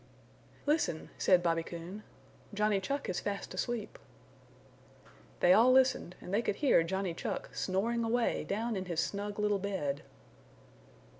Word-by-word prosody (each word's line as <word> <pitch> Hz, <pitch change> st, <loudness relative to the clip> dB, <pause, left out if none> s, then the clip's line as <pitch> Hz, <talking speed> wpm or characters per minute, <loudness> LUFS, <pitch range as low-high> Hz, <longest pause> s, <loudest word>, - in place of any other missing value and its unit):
"Listen," 295 Hz, -, 0 dB
said 180 Hz, -2 st, +4 dB
Bobby 165 Hz, -1 st, +2 dB
Coon. 170 Hz, +5 st, -7 dB, 0.5 s
"Johnny 210 Hz, -1 st, +2 dB
Chuck 275 Hz, +9 st, -3 dB
is 185 Hz, -, -1 dB
fast 200 Hz, -1 st, -4 dB
asleep." 240 Hz, -3 st, -3 dB, 1.4 s
They 180 Hz, -, +7 dB
all 235 Hz, +5 st, +6 dB
listened 255 Hz, -8 st, +3 dB
and 180 Hz, -, -8 dB
they 215 Hz, -, +3 dB
could 205 Hz, -, -1 dB
hear 275 Hz, -, +4 dB
Johnny 190 Hz, +1 st, -2 dB
Chuck -, -, -4 dB
snoring 225 Hz, +5 st, 0 dB
away 230 Hz, +1 st, +1 dB
down 225 Hz, +3 st, -2 dB
in 190 Hz, -1 st, -3 dB
his 170 Hz, -3 st, -2 dB
snug 200 Hz, +4 st, -2 dB
little 210 Hz, -1 st, +1 dB
bed. 185 Hz, -8 st, -2 dB
200 Hz, 140 wpm, -32 LUFS, 180-230 Hz, 1.4 s, They